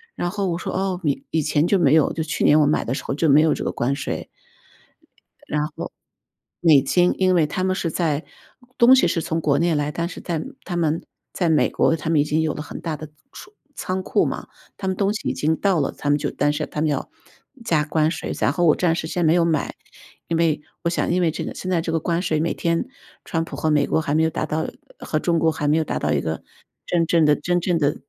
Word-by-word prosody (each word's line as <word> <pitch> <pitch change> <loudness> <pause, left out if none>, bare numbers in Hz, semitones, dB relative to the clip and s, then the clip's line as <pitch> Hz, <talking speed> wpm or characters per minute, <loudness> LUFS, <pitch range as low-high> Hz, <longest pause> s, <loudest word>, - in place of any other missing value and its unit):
然 175 - -2
后 200 -1 -2
我 170 -1 -1
说：” - - -4
哦， 190 -1 -1
以 145 -3 -1
以 160 - +1
前 150 +2 +1
就 200 - +3
没 150 -3 +4
有。” 155 - +3
就 160 - -2
是 155 - -10
去 - - -1
年 150 +1 +6
我 150 - +4
买 150 - +1
的 120 - -2
时 - - -4
候 - - -3
就 155 0 +1
没 145 +2 +7
有 160 0 +3
这 - - -4
个 - - -1
关 135 +3 -1
税。 - - -4 1.2
然 150 0 0
后 - - -7 0.7
美 155 -5 +6
金， 175 +6 +2
因 185 -1 +3
为 165 -3 +4
他 185 +5 -3
们 185 0 +1
是 165 - -2
在 155 -2 -1 0.5
东 245 +2 +7
西 180 - +4
是 165 -1 0
从 165 +1 -2
国 145 -2 +2
内 170 -2 +2
来， 145 0 -1
但 170 +3 -2
是 - - -9
在 165 -3 -2 0.2
他 175 - -4
们 160 -1 0 0.3
在 175 -3 0
美 155 - +3
国 160 - +2
他 160 +1 -5
们 160 -3 +3
已 - - +3
经 150 +2 0
有 160 -1 0
了 - - -6
很 - - -8
大 160 -3 -3
的 155 +1 -8 0.2
储 420 - -12 0.2
仓 185 +1 -3
库 - - +1
嘛， - - -4 0.3
他 190 - -4
们 190 - 0
东 200 +1 +1
西 215 - -5
已 - - -1
经 155 +2 +1
到 190 -1 +1
了， 140 - 0
他 145 - -2
们 145 - +4
就 145 -1 -3
但 145 0 +1
是 150 +1 -2
他 150 - -4
们 155 - +2
要 140 - -2 0.6
加 150 -3 +2
关 155 +1 +1
税， 160 - -4
然 - - +2
后 175 +2 +1
我 155 - +5
暂 165 -3 +1
时 160 - -3
先 175 0 -1
没 160 - +5
有 175 -1 +3
买， 160 -2 -1 0.5
因 165 - 0
为 160 -3 +1 0.2
我 170 - +1
想 170 - -1
因 180 +1 +2
为 165 -2 +2
这 - - -4
个 - - -5
现 185 - -5
在 170 -2 +2
这 165 - -3
个 165 - +1
关 170 +2 -1
税， 155 -4 0
每 165 - 0
天 165 0 0 0.4
川 165 -1 -1
普 - - -8
和 155 - 0
美 145 -1 +3
国 - - +1
还 145 0 -1
没 160 - +3
有 160 - +3
达 155 - -3
到 155 +1 -2 0.3
和 155 - -2
中 170 0 +1
国 160 0 +3
还 150 -2 -3
没 150 - +3
有 160 - +2
达 - - -3
到 - - -1
一 - - +1
个 80 0 -4 0.4
真 170 -1 +1
正 165 -2 +3
的 150 - +5
真 175 +4 0
正 175 -1 0
的， 145 -2 +2
呃， - - -4
160 Hz, 290 characters per minute, -22 LUFS, 150-175 Hz, 1.2 s, 没